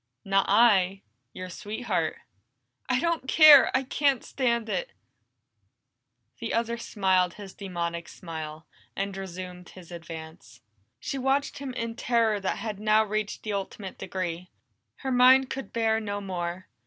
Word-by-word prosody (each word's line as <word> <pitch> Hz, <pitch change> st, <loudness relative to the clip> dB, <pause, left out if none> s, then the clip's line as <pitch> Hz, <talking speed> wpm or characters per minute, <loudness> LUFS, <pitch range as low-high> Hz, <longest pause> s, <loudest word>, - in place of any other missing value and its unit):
"Not 195 Hz, 0 st, +2 dB
I 195 Hz, -3 st, +4 dB, 0.3 s
your 185 Hz, +5 st, -7 dB
sweetheart." 220 Hz, +7 st, -2 dB, 0.7 s
"I 250 Hz, 0 st, +2 dB
don't 335 Hz, -4 st, -1 dB
care! 305 Hz, -3 st, +8 dB
I 265 Hz, -, -1 dB
can't 275 Hz, -1 st, +1 dB
stand 235 Hz, -4 st, 0 dB
it!" -, -, -3 dB, 1.5 s
The -, -, -3 dB
other 235 Hz, 0 st, 0 dB
smiled 190 Hz, -6 st, +1 dB
his 200 Hz, -2 st, -10 dB
demoniac 170 Hz, -3 st, -4 dB
smile, 160 Hz, -2 st, -8 dB, 0.3 s
and 195 Hz, 0 st, -3 dB
resumed 180 Hz, -1 st, -8 dB
his 180 Hz, -2 st, -14 dB
advance. 160 Hz, -7 st, -10 dB, 0.4 s
She 270 Hz, -, -4 dB
watched 270 Hz, +2 st, 0 dB
him 275 Hz, -2 st, -5 dB
in 230 Hz, -2 st, -3 dB
terror 230 Hz, -3 st, +1 dB
that 190 Hz, -, -2 dB
had 210 Hz, -1 st, -5 dB
now 215 Hz, +1 st, +4 dB
reached 215 Hz, 0 st, -3 dB
the 215 Hz, -, -3 dB
ultimate 195 Hz, 0 st, -5 dB
degree; 180 Hz, -2 st, -4 dB, 0.6 s
her 265 Hz, -, 0 dB
mind 255 Hz, +1 st, +6 dB
could 270 Hz, 0 st, -5 dB
bear 225 Hz, -1 st, +1 dB
no 205 Hz, -2 st, -4 dB
more. 180 Hz, -2 st, -5 dB
205 Hz, 140 wpm, -27 LUFS, 180-235 Hz, 1.5 s, care